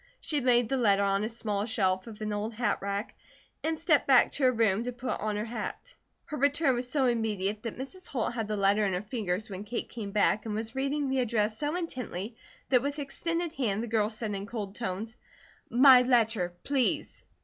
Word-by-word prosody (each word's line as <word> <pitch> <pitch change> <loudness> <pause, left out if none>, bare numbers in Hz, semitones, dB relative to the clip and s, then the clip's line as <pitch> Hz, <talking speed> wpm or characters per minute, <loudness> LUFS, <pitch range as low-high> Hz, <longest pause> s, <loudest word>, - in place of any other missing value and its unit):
She 300 -3 -1
laid 245 -2 +3
the 270 - 0
letter 200 -5 +3
on 200 +1 +1
a 215 - -1
small 215 -2 -2
shelf 190 -3 0
of 220 -2 -10
an 215 -1 -2
old 215 +2 -3
hatrack, 205 -2 -1 0.5
and 320 0 0
stepped 320 -2 +2
back 260 -3 +6
to 275 - 0
her 255 - +6
room 225 -3 +2
to 250 - -2
put 245 +1 -4
on 210 0 -2
her 210 +1 -2
hat. 235 - -6 0.3
Her 300 - -5
return 285 +1 +3
was 245 0 -2
so 275 -1 +1
immediate 215 -4 0
that 230 -1 -5
Mrs. 360 +9 -7
Holt 240 -3 -2
had 225 -3 -3
the 210 0 -2
letter 200 +2 +3
in 195 -2 +1
her 180 +3 -2
fingers 210 -2 -2
when 195 -2 -6
Kate 230 +3 -4
came 220 -4 -6
back, 210 +1 +2
and 210 - -2
was 220 +1 -3
reading 275 +2 -1
the 265 0 0
address 220 -3 0
so 295 +2 -1
intently, 250 - -4 0.3
that 250 -2 +5
with 285 +2 -3
extended 335 +4 -3
hand, 225 -7 -1
the - - -4
girl 215 -2 +1
said 215 -1 -4
in 200 0 -4
cold 205 -3 -5
tones: 220 +1 -4 0.5
"My 255 +1 +8
letter, 225 -8 +2
please!" 275 -3 -1
230 Hz, 210 wpm, -29 LUFS, 210-260 Hz, 0.5 s, My